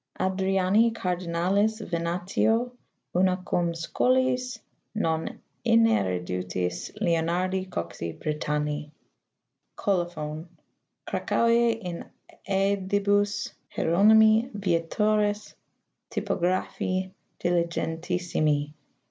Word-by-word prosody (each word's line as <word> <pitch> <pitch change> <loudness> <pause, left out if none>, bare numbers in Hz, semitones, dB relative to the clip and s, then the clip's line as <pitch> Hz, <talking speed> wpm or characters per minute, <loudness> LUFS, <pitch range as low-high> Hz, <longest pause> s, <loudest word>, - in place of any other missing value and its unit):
Adriani 190 +3 +2
Cardinalis 185 +2 0
Venatio, 180 +7 0 0.4
una 185 0 +3
cum 170 -1 +1
Scholiis 255 +8 +1 0.4
non 160 -6 -1 0.2
ineruditis 90 - +1
Leonardi 175 +3 0
Coxi 85 - -4
Britanni. 150 -1 -2 0.9
[Colophon 170 -4 -2 0.3
:] - - -46
Cracouise, 235 0 +2
in 175 -2 -5 0.4
sedibus 200 +1 +1 0.2
Hier 160 - -1
onymi 220 +4 +6
Vietoris 205 +3 0 0.6
Typographi 185 +1 -1 0.3
diligentissimi. 170 -3 0
185 Hz, 65 wpm, -26 LUFS, 165-210 Hz, 0.9 s, onymi